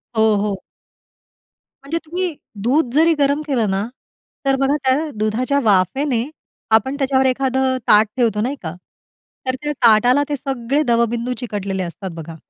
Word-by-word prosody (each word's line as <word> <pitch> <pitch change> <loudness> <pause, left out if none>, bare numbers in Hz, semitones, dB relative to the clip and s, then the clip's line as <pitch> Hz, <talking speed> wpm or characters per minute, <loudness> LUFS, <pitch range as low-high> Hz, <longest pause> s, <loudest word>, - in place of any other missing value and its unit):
हो, 220 -1 +3
हो. 205 -1 -1 1.3
म्हणजे 295 +4 -2
तुम्ही 350 +1 -3 0.3
दूध 255 +1 +1
जरी 330 +2 +5
गरम 285 +1 +2
केलं 240 -7 0
ना, 195 +2 -1 0.6
तर 270 - +3
बघा 275 +1 +2
त्या 275 +4 +1
दुधाच्या 240 +7 0
वाफेने 225 - +2 0.5
आपण 265 +6 +1
त्याच्यावर 265 -1 +2
एखादं 260 0 +1
ताट 210 +1 +6
ठेवतो 225 -4 +1
नाही 255 +6 -1
का? 160 0 -5 0.7
तर 255 - 0
त्या 295 - -1
ताटाला 245 +5 +5
ते 290 - 0
सगळे 270 +1 -2
दवबिंदू 235 -1 0
चिकटलेले 200 -5 -3
असतात 185 +2 -6
बघा. 165 0 -8
250 Hz, 145 wpm, -19 LUFS, 215-275 Hz, 1.3 s, ताट